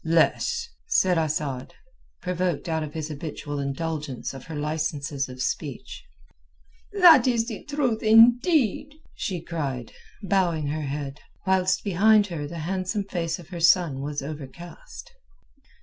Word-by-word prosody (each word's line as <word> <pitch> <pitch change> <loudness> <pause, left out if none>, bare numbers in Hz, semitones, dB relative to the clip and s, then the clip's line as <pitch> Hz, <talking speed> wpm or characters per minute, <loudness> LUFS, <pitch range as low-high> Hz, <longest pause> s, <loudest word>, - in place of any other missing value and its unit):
"Less," 470 - +2 0.2
said 185 - +3
Asad, 145 -5 -2 0.5
provoked 180 -3 -1
out 160 -1 0
of 150 0 -6
his 155 -1 -4
habitual 145 -1 -5
indulgence 140 -1 -3
of 135 -2 -10
her 160 - -7
licences 145 -2 -2
of 125 0 -5
speech. - - -4 0.9
"That 340 - +7
is 230 -2 +1
the 220 -4 -6
truth, 275 -6 -1
indeed!" 245 - +4 0.2
she 180 -4 -3
cried, 140 -9 -4 0.3
bowing 180 -6 +1
her 155 +1 -2
head, 140 0 -5 0.3
whilst 185 -1 +2
behind 210 +2 +4
her 145 -3 -4
the 170 - -7
handsome 190 +3 -1
face 170 -4 -3
of 175 -3 -13
her 175 -2 -6
son 165 -5 +4
was 145 0 -3
overcast. 155 - -9
165 Hz, 135 wpm, -25 LUFS, 145-205 Hz, 0.9 s, That